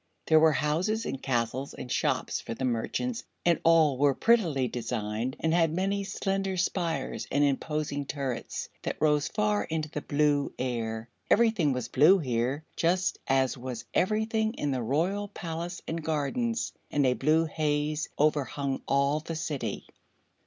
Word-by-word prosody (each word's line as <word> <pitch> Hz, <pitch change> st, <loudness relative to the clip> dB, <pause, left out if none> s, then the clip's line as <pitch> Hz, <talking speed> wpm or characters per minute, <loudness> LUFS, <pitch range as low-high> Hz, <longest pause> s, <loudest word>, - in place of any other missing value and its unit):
There 160 Hz, -1 st, +6 dB
were 160 Hz, 0 st, +5 dB
houses 170 Hz, +10 st, 0 dB
and 135 Hz, -, -4 dB
castles 125 Hz, +1 st, -1 dB
and 125 Hz, -, -7 dB
shops -, -, 0 dB
for 115 Hz, -, -6 dB
the 130 Hz, -, -2 dB
merchants 175 Hz, -, -1 dB, 0.2 s
and 170 Hz, -1 st, +4 dB
all 160 Hz, -5 st, +4 dB
were 140 Hz, -1 st, +4 dB
prettily 170 Hz, -, +3 dB
designed 115 Hz, 0 st, -3 dB
and 160 Hz, 0 st, +1 dB
had 165 Hz, -2 st, +3 dB
many 195 Hz, +4 st, 0 dB
slender 195 Hz, -1 st, -2 dB
spires 175 Hz, -1 st, -1 dB
and 145 Hz, -, +3 dB
imposing 145 Hz, 0 st, -1 dB
turrets 135 Hz, -5 st, -3 dB
that -, -, -4 dB
rose 150 Hz, -1 st, +3 dB
far 210 Hz, -1 st, +1 dB
into 155 Hz, -1 st, -3 dB
the 150 Hz, -, -3 dB
blue 145 Hz, -1 st, +1 dB
air. 115 Hz, -3 st, -3 dB, 0.2 s
Everything 220 Hz, -10 st, +4 dB
was 125 Hz, -3 st, -2 dB
blue 155 Hz, +9 st, +6 dB
here, 130 Hz, 0 st, -1 dB
just 180 Hz, +2 st, +1 dB
as 130 Hz, -1 st, +2 dB
was 125 Hz, -2 st, -6 dB
everything 220 Hz, +3 st, +1 dB
in 145 Hz, -, -1 dB
the 130 Hz, -2 st, -1 dB
Royal 170 Hz, -, 0 dB
Palace 175 Hz, -2 st, -5 dB
and 165 Hz, 0 st, -3 dB
gardens, 160 Hz, -, -1 dB, 0.2 s
and 145 Hz, -2 st, +2 dB
a 125 Hz, -, +4 dB
blue 155 Hz, +5 st, +2 dB
haze 150 Hz, 0 st, -1 dB
overhung 145 Hz, -2 st, 0 dB
all 140 Hz, +2 st, +2 dB
the 160 Hz, +1 st, -6 dB
city. 140 Hz, -9 st, -3 dB
150 Hz, 150 wpm, -28 LUFS, 135-175 Hz, 0.2 s, There